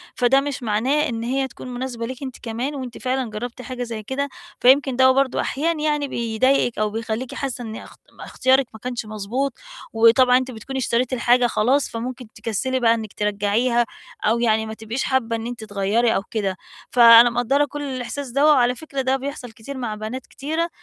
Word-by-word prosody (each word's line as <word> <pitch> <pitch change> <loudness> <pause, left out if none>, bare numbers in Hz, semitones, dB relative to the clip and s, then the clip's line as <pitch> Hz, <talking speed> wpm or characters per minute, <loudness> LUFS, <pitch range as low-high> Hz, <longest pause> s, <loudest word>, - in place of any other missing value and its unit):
فده 250 +2 +4
مش 280 -3 -4
معناه 260 +8 +1
إن 230 -1 -4
هي 265 +2 0
تكون 255 - -11
مناسبة 245 -2 -4
ليكِ 260 +3 -7
أنتِ 260 -2 -6
كمان، 245 +5 -3
وأنتِ 255 -3 -6
فعلًا 255 -2 -2
جربتِ 235 +4 -6
حاجة 250 +1 -5
زي 230 -3 -6
كده، 280 +5 -3 0.3
فيمكن 265 0 +5
ده 260 0 +6
برضه 270 0 +1
أحيانًا 310 +3 -1
يعني 295 -2 0
بيضايقِك 235 0 +1
أو 215 - +1
بيخليكِ 225 +3 -4
حاسّة 270 -2 -4
إن 220 -1 -6
اخت - - -11 0.2
اختيارك 260 +1 +2
ما 220 - -11
كانش 245 -1 -4
مضبوط، 215 +6 -3 0.4
وطبعًا 245 +3 +5
أنت 260 0 -2
بتكوني 265 +4 -6
اشتريتِ 250 +1 0
الحاجة 245 0 +3
خلاص، 255 +5 +1
فممكن 250 +1 -5
تكسلي 235 +4 -2
بقى 230 -1 +4
إنّك 220 -3 -5
ترجعيها 210 +4 +1 0.4
أو 225 +2 +2
يعني 220 -2 +2
ما 220 - -6
تبقيش 220 +4 -4
حابّة 235 -3 0
إن 225 0 -4
أنتِ 240 -2 -6
تغيري 210 +3 +1
أو 195 - 0
كده. 195 -4 -2 0.3
فأنا 235 0 +8
مقدرة 245 +5 +1
كل 290 0 -7
الإحساس 265 0 -5
دوّة، 280 +5 +4
وعلى 250 -3 +3
فكرة 275 0 -4
ده 260 +1 +1
بيحصل 270 -2 -6
كتير 230 +5 -9
مع 235 -4 -3
بنات 220 +5 -6
كتيرة، 320 +4 -3
245 Hz, 185 wpm, -22 LUFS, 225-265 Hz, 0.4 s, فأنا